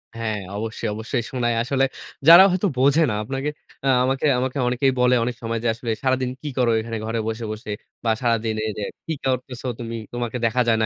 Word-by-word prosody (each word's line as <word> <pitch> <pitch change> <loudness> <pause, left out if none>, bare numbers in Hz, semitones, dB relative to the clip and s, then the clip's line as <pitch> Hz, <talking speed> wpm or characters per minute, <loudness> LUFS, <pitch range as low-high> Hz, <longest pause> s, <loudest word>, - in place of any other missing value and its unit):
হ্যাঁ 110 -2 -2 0.2
অবশ্যই, 110 +1 -3
অবশ্যই 115 +2 -2
শোনায়। 120 -2 0
আসলে 135 +2 +2 0.4
যারা 170 +3 +11
হয়তো 185 +3 +1
বোঝে 140 +5 +4
না 105 - -1
আপনাকে 135 +5 -3 0.4
আ - - +2 0.2
আমাকে, 135 +3 0
আমাকে 130 +2 -2
অনেকেই 125 +2 +2
বলে 125 0 +4
অনেক 120 0 -2
সময় 115 -1 -2
যে - - +1
আসলে, 115 0 -4
"সারাদিন 130 -1 +1
কি 150 - -4
করো 120 -2 +3
এখানে 115 0 -4
ঘরে 115 0 -2
বসে, 115 +1 -3
বসে? 110 0 -6 0.3
বা 115 - +3
সারাদিন 115 -2 +1
এইযে 105 -1 -4 0.2
কি 165 - -2
করতেছো 130 -1 -2
তুমি? 115 -1 -5 0.2
তোমাকে 120 0 -3
দেখা 125 +2 +2
যায় 115 -1 +4
না - - +3
120 Hz, 200 wpm, -23 LUFS, 115-130 Hz, 0.4 s, যারা